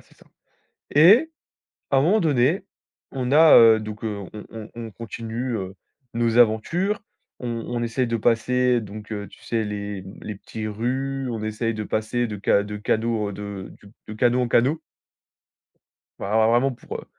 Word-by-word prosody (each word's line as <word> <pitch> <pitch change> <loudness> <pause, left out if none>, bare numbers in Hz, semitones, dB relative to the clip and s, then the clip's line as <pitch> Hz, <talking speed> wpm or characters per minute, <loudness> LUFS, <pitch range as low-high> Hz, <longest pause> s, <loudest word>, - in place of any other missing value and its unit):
c'est - - -24
ça. - - -21 0.7
Et 205 - +6 0.6
à 135 - +5
un - - +3
moment 190 +9 +4
donné, 155 - +2 0.5
on 125 -1 -2
a, 155 +2 +7
heu, 115 -1 +8
donc, 105 0 -7
heu, 105 -3 -4
on 105 - -8
on 110 -1 -8
on 115 -1 -7
continue, 115 +3 -5
heu, 95 -1 -5 0.4
nos 115 0 +1
aventures. 165 - +2 0.4
On 125 - -5 0.2
on 120 -1 -2
essaye 120 +2 -1
de 115 - 0
passer 120 +2 +2
donc, 105 +1 -9
heu, 105 -1 -5
tu - - -18
sais 115 -1 -1
les 100 -1 -5 0.2
les 105 - -6
petits 110 +2 -7
rues, 130 +5 -2
on 115 - -4
essaye 110 +1 -2
de 110 - -4
passer 115 +4 -1
de 105 -3 -7
ca 100 - +3
de 105 0 -6
cadeaux 110 0 -1
de 100 -1 -7 0.4
de 110 - -6
canaux 120 +3 +2
en 125 - 0
canaux. 135 +8 +2 1.4
Ben, - - -4
alors 110 +2 +3
vraiment 125 +3 +3
pour, 120 - -8
heu - - -9
115 Hz, 175 wpm, -23 LUFS, 105-125 Hz, 1.4 s, heu